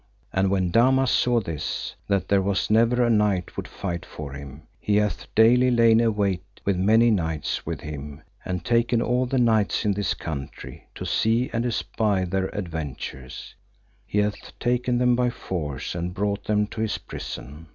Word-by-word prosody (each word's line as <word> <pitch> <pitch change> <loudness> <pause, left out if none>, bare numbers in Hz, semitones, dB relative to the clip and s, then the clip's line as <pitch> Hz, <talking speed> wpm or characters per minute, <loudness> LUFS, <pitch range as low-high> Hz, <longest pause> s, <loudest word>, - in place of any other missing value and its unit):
And 95 0 +2
when 95 -2 +1
Damas 130 +4 +4
saw 120 -1 +3
this, 80 -7 -4
that 100 -2 0
there 100 -1 +3
was 100 +2 0
never 115 +2 +4
a - - +2
knight 105 -5 +1
would - - -5
fight 85 -3 -4
for 75 -3 -8
him, 70 +2 -9 0.2
he 105 - 0
hath 105 -1 0
daily 125 +3 +6
lain 115 -2 +5
await 100 -5 +1 0.2
with 100 - +2
many 110 +6 +4
knights 80 -7 -1
with - - -3
him, 75 0 -7 0.2
and 90 -2 -4
taken 120 0 +2
all 125 +2 +1
the 130 - 0
knights 110 -3 +2
in 105 - +3
this 100 0 -1
country 70 -4 -7
to - - -6
see 115 +3 +1
and 115 +1 0
espy 105 -4 0
their 95 +1 -1
adventures, 80 -9 -6 0.5
he - - -3
hath 105 0 -2
taken 125 0 0
them 125 0 +3
by 125 0 +2
force 80 - -4
and 85 +1 -4
brought 100 +1 -1
them 105 0 +2
to 110 +1 -6
his 110 -1 0
prison. 75 +5 -8
105 Hz, 170 wpm, -25 LUFS, 90-115 Hz, 0.5 s, daily